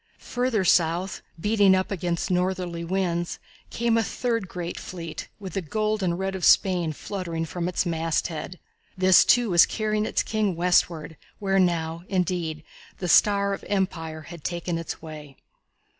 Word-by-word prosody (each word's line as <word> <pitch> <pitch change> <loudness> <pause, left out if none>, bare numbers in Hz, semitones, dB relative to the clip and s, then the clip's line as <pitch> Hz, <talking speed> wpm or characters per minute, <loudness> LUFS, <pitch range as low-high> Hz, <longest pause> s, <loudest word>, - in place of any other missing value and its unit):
Further 245 -5 +1
south, 175 +3 +2 0.2
beating 205 0 +4
up 185 +1 -1
against 175 -3 -2
the - - +1
northerly 180 -2 -1
winds, 175 -1 -1 0.3
came 230 -1 +1
a - - +2
third 230 -4 -2 0.3
fleet 165 -3 -7
with 190 -3 -7
the 195 - -1
gold 215 +5 -1
and 175 -2 0
red 190 +1 -2
of 190 -2 -5
Spain 180 -4 +4
fluttering 170 0 -4
from 170 +2 -3
its 180 - 0
masthead. 165 +1 -2 0.4
This, 185 0 +6
too, 240 -4 +3
was 170 -1 +7
carrying 215 -1 -1
its - - 0
King 215 -4 0
westward, 165 -3 +1 0.2
where 195 -1 +1
now, 165 -2 0
indeed, 175 -4 -1 0.3
the 180 - -4
star 200 +3 +4
of - - -6
empire 165 -5 -2
had 165 0 -11
taken 170 -1 -2
its 165 -1 -6
way. 150 -3 -10
180 Hz, 155 wpm, -25 LUFS, 165-195 Hz, 0.4 s, was